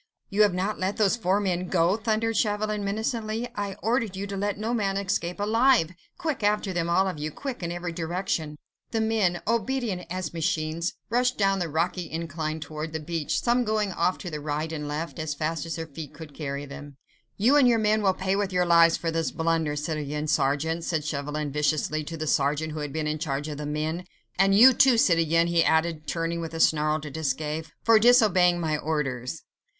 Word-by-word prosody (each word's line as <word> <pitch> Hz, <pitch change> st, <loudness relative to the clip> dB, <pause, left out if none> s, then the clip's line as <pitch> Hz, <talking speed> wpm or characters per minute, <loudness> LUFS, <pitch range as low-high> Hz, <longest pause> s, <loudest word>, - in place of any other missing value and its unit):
"You 205 Hz, +2 st, +2 dB
have 205 Hz, -3 st, +5 dB
not 195 Hz, +4 st, -2 dB
let 190 Hz, +2 st, -1 dB
those 210 Hz, -2 st, +3 dB
four 195 Hz, -3 st, +1 dB
men 185 Hz, -3 st, -1 dB
go?" 175 Hz, +1 st, +2 dB
thundered 225 Hz, +1 st, 0 dB
Chauvelin, 210 Hz, -1 st, 0 dB
menacingly. 220 Hz, +2 st, -2 dB
"I 205 Hz, -3 st, -4 dB
ordered 225 Hz, -3 st, 0 dB
you 195 Hz, +1 st, -4 dB
to 200 Hz, 0 st, -5 dB
let 205 Hz, +1 st, -1 dB
no 220 Hz, +3 st, -2 dB
man 200 Hz, -4 st, 0 dB
escape 190 Hz, -2 st, -2 dB
alive!—Quick, 230 Hz, -, +1 dB
after 205 Hz, -2 st, +1 dB
them 170 Hz, -1 st, -1 dB
all 190 Hz, +3 st, +3 dB
of 180 Hz, -5 st, -4 dB
you! 150 Hz, +1 st, -2 dB
Quick, 260 Hz, -, -6 dB
in 170 Hz, -1 st, -3 dB
every 175 Hz, 0 st, -4 dB
direction!" 165 Hz, -2 st, -3 dB, 0.3 s
The 225 Hz, -, -1 dB
men, 220 Hz, -6 st, +1 dB
obedient 230 Hz, -5 st, -1 dB
as 185 Hz, -2 st, -4 dB
machines, 160 Hz, 0 st, -1 dB, 0.2 s
rushed 250 Hz, +1 st, +2 dB
down 195 Hz, -1 st, +2 dB
the 175 Hz, -2 st, -2 dB
rocky 165 Hz, +2 st, -1 dB
incline 160 Hz, -1 st, -4 dB
towards 155 Hz, 0 st, -6 dB
the 160 Hz, -, -2 dB
beach, 160 Hz, 0 st, -2 dB
some 245 Hz, +1 st, +2 dB
going 215 Hz, -3 st, 0 dB
off 180 Hz, +1 st, 0 dB
to 165 Hz, -5 st, -6 dB
right 150 Hz, +2 st, -3 dB
and 150 Hz, -2 st, -4 dB
left, 155 Hz, +3 st, -4 dB
as 155 Hz, -2 st, -3 dB
fast 155 Hz, +2 st, -2 dB
as 165 Hz, -, -3 dB
their 165 Hz, -, -4 dB
feet 150 Hz, 0 st, -9 dB
could 155 Hz, -1 st, -10 dB
carry 140 Hz, -1 st, -4 dB
them. 145 Hz, 0 st, -10 dB, 0.4 s
"You 240 Hz, +8 st, +4 dB
and 280 Hz, -4 st, +6 dB
your 235 Hz, -1 st, +4 dB
men 215 Hz, 0 st, +2 dB
will 190 Hz, -2 st, +2 dB
pay 190 Hz, +1 st, 0 dB
with 200 Hz, -1 st, -1 dB
your 180 Hz, -1 st, +2 dB
lives 170 Hz, -1 st, +5 dB
for 165 Hz, -, -2 dB
this 165 Hz, 0 st, 0 dB
blunder, 160 Hz, -2 st, 0 dB
citoyen 150 Hz, -1 st, -3 dB
sergeant," 150 Hz, +4 st, 0 dB
said 160 Hz, -3 st, -2 dB
Chauvelin 150 Hz, 0 st, -3 dB
viciously 150 Hz, +1 st, 0 dB
to 165 Hz, +2 st, -6 dB
the 155 Hz, -, -3 dB
sergeant 145 Hz, +2 st, +1 dB
who 155 Hz, -, -5 dB
had 150 Hz, -1 st, -4 dB
been 155 Hz, +1 st, -2 dB
in 155 Hz, 0 st, -2 dB
charge 145 Hz, -1 st, -2 dB
of 150 Hz, -2 st, -6 dB
the 150 Hz, -, -4 dB
men; 155 Hz, +4 st, -2 dB, 0.3 s
"and 195 Hz, +1 st, +5 dB
you, 250 Hz, +5 st, +9 dB
too, 255 Hz, -1 st, +5 dB
citoyen," 165 Hz, -4 st, +3 dB
he 170 Hz, -1 st, +3 dB
added, 160 Hz, -1 st, +1 dB
turning 165 Hz, +2 st, -2 dB
with 165 Hz, 0 st, -6 dB
a -, -, -4 dB
snarl 155 Hz, -1 st, +3 dB
to 150 Hz, -1 st, -7 dB
Desgas, 155 Hz, +1 st, -2 dB, 0.2 s
"for 230 Hz, -1 st, +6 dB
disobeying 210 Hz, -7 st, +5 dB
my 160 Hz, -2 st, 0 dB
orders." 150 Hz, -3 st, -3 dB
170 Hz, 205 wpm, -26 LUFS, 155-205 Hz, 0.4 s, you